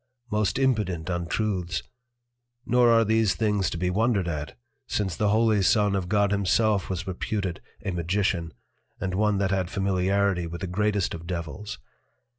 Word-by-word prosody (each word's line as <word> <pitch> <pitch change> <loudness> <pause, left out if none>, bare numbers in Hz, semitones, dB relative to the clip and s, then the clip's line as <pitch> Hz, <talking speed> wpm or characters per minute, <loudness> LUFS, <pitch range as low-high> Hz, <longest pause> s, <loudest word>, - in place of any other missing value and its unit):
Most 105 -3 +1
impudent 105 -11 0
Untruths! 90 +1 -1 0.8
nor 125 -1 +4
are 115 -1 +5
these 110 -1 +2
things 105 -4 +1
to - - -4
be 90 +1 0
wondered 105 -2 +1
at, 75 -5 -4 0.3
since 95 -5 -1
the 105 +2 +1
Holy 110 -1 +3
Son 105 +1 +3
of 90 -2 -2
God 100 -1 +2
himself 100 0 +2
was 95 0 -3
reputed 95 0 -3 0.2
a 100 - 0
Magician, 85 -1 -1 0.5
and 95 -1 -2
one 105 +1 +2
that 95 -1 0
had 95 -3 0
Familiarity 95 -1 +1
with 85 +1 -7
the - - -1
greatest 100 +1 0
of 85 0 -8
Devils. 90 +4 -5
100 Hz, 155 wpm, -26 LUFS, 90-105 Hz, 0.8 s, are